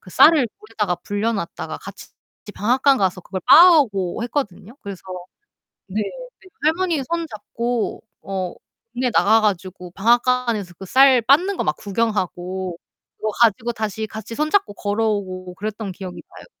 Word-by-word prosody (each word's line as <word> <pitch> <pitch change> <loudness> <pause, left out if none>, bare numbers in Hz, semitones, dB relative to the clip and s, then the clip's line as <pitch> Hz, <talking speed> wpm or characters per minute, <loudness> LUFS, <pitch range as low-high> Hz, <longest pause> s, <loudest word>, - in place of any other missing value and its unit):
그 - - -16
쌀을 295 - +6
물에다가 210 -4 -2
불려놨다가 205 -3 -3
같이 - - -11 0.4
이제 205 - -10
방앗간 260 +7 +3
가서 185 -1 0
그걸 185 +1 -6
빻아 345 0 +9
오고 195 -6 -2
했거든요. 235 -4 -4
그래서 200 -2 -8 0.9
네. 210 +3 -2 0.4
그때 375 - -18
할머니 325 -1 +1
손 335 -1 -1
잡고 230 +2 -3 0.2
어 190 -2 -4 0.4
동네 250 0 0
나가 220 +1 +4
가지고 185 -3 -2
방앗간에서 235 -3 +1
그 195 - -7
쌀 260 +4 +5
빻는 330 - +3
거 - - 0
막 150 - +1
구경하고 190 -4 -2 0.4
그거 215 0 -2
가지고 235 +1 +3
다시 220 0 -3
같이 220 +1 -8
손잡고 305 - +1
걸어오고 200 -4 -2
그랬던 210 0 -5
기억이 185 -1 -8
나요. - - -12
215 Hz, 325 characters per minute, -21 LUFS, 195-250 Hz, 0.9 s, 빻아